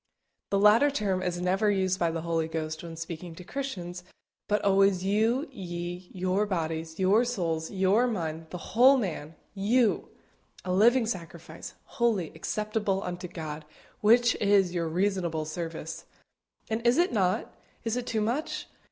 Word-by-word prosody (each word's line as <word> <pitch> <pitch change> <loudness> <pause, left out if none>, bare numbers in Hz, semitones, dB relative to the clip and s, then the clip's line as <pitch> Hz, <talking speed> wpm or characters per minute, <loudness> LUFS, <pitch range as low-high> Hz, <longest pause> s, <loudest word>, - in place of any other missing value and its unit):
The 200 - +2
latter 210 +8 +6
term 200 -9 -1
is 180 -1 -2
never 190 +4 +2
used 190 -2 +1
by 170 - +2
the 165 0 -3
Holy 165 -1 0
Ghost 155 -1 -4
when 165 -1 -8
speaking 165 +1 -7
to 180 - -10
Christians, 180 -8 -5 0.4
but 210 0 +1
always 195 -1 +4
you, 225 +9 +1
ye, 175 -4 -6
your 185 +3 0
bodies, 165 -3 -3
your 195 +5 +4
souls, 170 -9 -2
your 195 +5 +3
mind, 165 -7 -3
the 180 - -6 0.2
whole 260 +5 +7
man 165 - -4 0.2
YOU, 215 +4 +2 0.6
"a 180 - -1
living 235 +5 +5
sacrifice, 185 -7 -7
holy, 230 - 0
acceptable 210 +2 -2
unto 180 0 -5
God, 155 -3 -6 0.4
which 235 +2 +5
is 200 -3 +3
your 170 -2 -1
reasonable 175 -3 0
service." 160 0 -6 0.6
And 220 +1 -2
is 240 - +4
it 350 -3 +2
not? 190 0 0 0.3
Is 225 0 -1
it 250 -1 -3
too 220 -1 0
much? 240 +9 -2
190 Hz, 150 wpm, -28 LUFS, 170-215 Hz, 0.6 s, whole